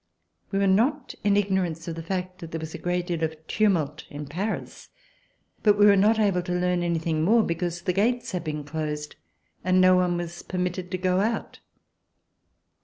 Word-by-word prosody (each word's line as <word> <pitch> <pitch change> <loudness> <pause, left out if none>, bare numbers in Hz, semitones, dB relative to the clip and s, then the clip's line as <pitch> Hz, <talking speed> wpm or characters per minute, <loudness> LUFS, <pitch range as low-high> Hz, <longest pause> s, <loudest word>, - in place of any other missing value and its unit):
We 195 - -2
were 200 - +3
not 245 +9 +2
in 200 0 +3
ignorance 185 -5 0
of 165 - -3
the 165 - -5
fact 185 +2 -4
that 165 -3 -8
there 165 - -4
was 160 0 -7
a - - -6
great 175 0 -1
deal 170 -3 -2
of 160 0 -1
tumult 160 -9 0
in 145 +1 -7
Paris; 190 +10 -4 0.7
but 210 -2 +4
we 205 - +6
were 205 -1 +7
not 210 +3 +4
able 200 -4 +2
to 180 0 -4
learn 180 0 +1
anything 165 -2 0
more, 220 +6 +4
be 170 - 0
cause 170 0 -4
the 180 - 0
gates 235 +6 +1
had 180 -3 -3
been 150 -2 -4
closed 150 0 -4 0.5
and 185 0 +3
no 185 0 +6
one 180 -1 +1
was 175 0 -5
permitted 180 0 -3
to 185 - -2
go 185 0 +1
out. 225 +3 -2
180 Hz, 195 wpm, -26 LUFS, 165-195 Hz, 0.7 s, were